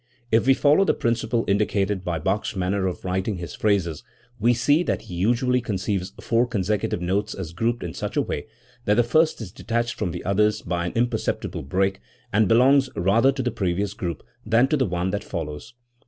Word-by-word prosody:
If 115 +3 +3
we 135 - +6
follow 150 +8 +4
the - - +2
principle 115 0 0
indicated 100 -1 +1
by 85 -3 -2
Bach's 95 +7 -1
manner 95 +1 0
of 90 - -5
writing 95 +3 -1
his 85 -1 -7
phrases, 95 -7 0 0.4
we 115 +3 +4
see 145 +7 +3
that 180 - -1
he - - -10
usually 120 +7 +1
conceives 95 -3 -2
four 120 +1 +1
con 110 -6 -1
secutive 105 -2 -1
notes 100 +4 -1
as 85 -4 -6
grouped 115 +6 -1
in 85 -2 -5
such - - -4
a - - +4
way - - -4 0.4
that 105 - +3
the 120 - +4
first 155 +4 +2
is 100 -5 -7
detached 120 +3 -2
from 105 - -2
the 85 +1 -6
others 105 +2 +2
by 85 0 -2
an - - -5
imperceptible 120 -1 -1
break, 95 +7 0 0.3
and 105 0 +4
belongs 130 +4 +5
rather 105 +10 +3
to 135 -1 -3
the 125 - 0
previous 95 0 -1
group 85 -5 -5 0.2
than 115 +3 +3
to - - +2
the 130 -3 +1
one 90 +1 -1
that 100 - -3
follows. 80 +5 -6
105 Hz, 200 wpm, -24 LUFS, 90-120 Hz, 0.4 s, we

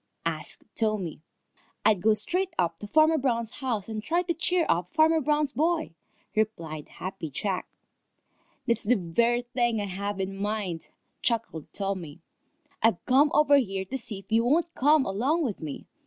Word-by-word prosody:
asked - - -2
Tommy. 210 -9 -1 0.6
"I'd 205 -5 +4
go 215 +2 +4
straight 355 - -1
up 170 -1 0
to 205 - -7
Farmer 315 +6 +4
Brown's 235 -4 0
house 230 -7 -1
and 220 -1 -4
try 340 +9 0
to 345 -1 -1
cheer 340 +1 +1
up 175 +1 +1
Farmer 315 - +4
Brown's 300 0 +1
boy," 315 - 0 0.4
replied 170 -9 -2
Happy 180 -4 -6
Jack. 185 +6 -2 1.0
"That's 235 -2 +1
the 245 +4 +3
very 235 +6 +1
thing 240 -2 0
I 205 - -1
have 200 +1 -4
in 195 0 -2
mind," 200 -4 -3 0.3
chuckled 230 - -1
Tommy. 190 -6 -3 0.6
"I've 225 -5 +2
come 275 +4 +5
over 290 -1 +6
here 195 -7 -1
to 265 +8 -4
see 220 -3 -3
if 195 +2 -14
you 225 +1 +4
won't 325 +7 +2
come 295 +1 +4
along 265 - +1
with 230 -8 -3
me. 150 -3 -6
225 Hz, 165 wpm, -27 LUFS, 195-285 Hz, 1.0 s, over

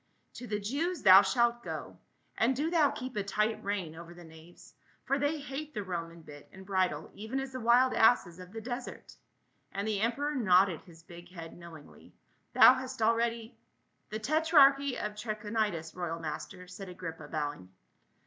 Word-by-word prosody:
" - - -44
To 245 - -8
the 210 -1 -2
Jews 290 - -2
thou 190 -1 +9
shalt 240 +1 +1
go; - - -7 0.4
and 245 +4 +2
do 305 +5 -1
thou 315 -5 +4
keep 255 -1 -7
a 205 - 0
tight 210 +3 -1
rein 195 -6 -3
over 170 +1 -11
the 175 - -12
knaves, 160 +1 -16 0.3
for 275 +1 0
they 290 +3 0
hate 290 +1 -7
the 210 - -3
Roman 170 -3 -6
bit 145 -1 -13
and 190 0 -13
bridle 185 -6 -1
even 220 +6 -4
as 270 0 -5
the 260 - -6
wild 245 +2 +4
asses 195 -6 +3
of 180 0 -11
the 225 +1 -7
desert," 245 +2 -7 0.6
and 200 +2 -3
the 210 -2 -1
emperor 280 +6 0
nodded 190 - +3
his 165 -1 -16
big 175 +1 -13
head 165 -3 -10
know 170 -1 -12
ingly. 155 -2 -15 0.4
"Thou - - +9
hast 260 -2 -4
already 230 0 0 0.2
— - - -45
?" - - -45
"The 215 - -4
tetrarchy 280 0 +4
of 210 0 -4
Trachonitis, 210 -5 -3
royal 170 -2 -4
master," 180 +3 -7
said 185 +1 -9
Agrippa 165 -4 -8
bowing. 145 - -4
210 Hz, 185 wpm, -30 LUFS, 175-255 Hz, 0.6 s, thou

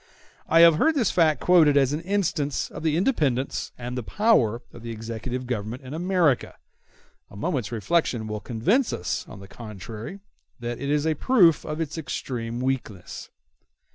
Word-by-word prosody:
I 165 +1 +6
have 165 -2 +7
heard 320 - +3
this 240 -9 +2
fact 160 -4 +3
quoted 160 -5 +5
as 135 0 +3
an 150 - -2
instance 175 -6 -1
of - - -8
the 160 -1 +1
independence 145 - 0
and 125 0 -5
the 125 - -2
power 120 - +2
of 120 - -11
the 115 - -7
executive 115 +3 -5
government 120 +1 -4
in 130 +2 -8
America: 170 -5 +1 0.7
a - - -14
moment's 105 +1 -2
reflection 120 - 0
will 105 0 -4
convince 160 - +1
us, 90 - -3
on 100 - -11
the 100 - -11
contrary, 110 - -8 0.4
that 120 0 -4
it 140 +2 -3
is 150 +1 +1
a 160 - +2
proof 175 - +4
of 150 0 -5
its 160 0 -3
extreme 120 -4 -4
weakness. 125 -8 -4
135 Hz, 170 wpm, -25 LUFS, 115-165 Hz, 0.7 s, have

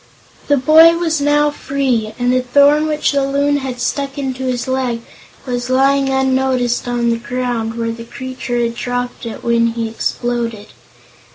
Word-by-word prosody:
The 285 - +3
boy 320 +5 +6
was 325 -3 0
now 295 +1 +3
free, 260 -7 -2
and 245 0 +1
the 255 - +2
thorn 285 +4 +4
which 300 -1 0
the 280 -1 +1
Loon 285 +1 +1
had 260 -3 -5
stuck 275 +2 -2
into 265 -2 -3
his 250 -1 -2
leg 255 -3 -1 0.4
was 245 -1 -3
lying 270 +1 +3
unnoticed 260 -2 0
on 240 -1 0
the 230 - 0
ground, 240 -2 -3
where 230 -1 -2
the 230 0 -7
creature 255 -1 -5
had 235 -1 0
dropped 245 0 -4
it 225 - -8
when 235 0 +2
he 230 -1 -2
exploded. 230 -1 -3
255 Hz, 165 wpm, -17 LUFS, 240-280 Hz, 0.4 s, boy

